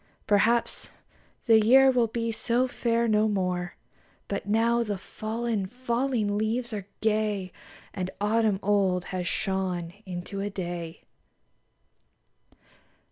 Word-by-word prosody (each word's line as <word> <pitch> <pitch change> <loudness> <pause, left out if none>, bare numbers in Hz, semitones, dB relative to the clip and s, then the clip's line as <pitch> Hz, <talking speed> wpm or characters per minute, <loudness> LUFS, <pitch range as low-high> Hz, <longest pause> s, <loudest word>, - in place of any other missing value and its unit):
Perhaps 225 +3 +2 0.6
the 225 -2 +6
year 265 +4 +7
will 245 -2 +2
be 230 +1 -2
so 240 +3 +1
fair 235 -1 0
no 215 0 +3
more, 180 -3 -1 0.5
But 200 0 -4
now 230 +3 +3
the 210 -4 -2
fallen, 220 +1 -3
falling 235 -2 -1
leaves 235 +2 -1
are 200 -2 -5
gay, 210 -4 0 0.4
And 185 -2 -3
autumn 210 -1 +2
old 190 -3 +2
has 180 -1 -2
shone 185 -4 -2
into 180 +2 -5
a 205 - -2
Day! 175 -3 -5
210 Hz, 115 wpm, -27 LUFS, 190-230 Hz, 0.6 s, year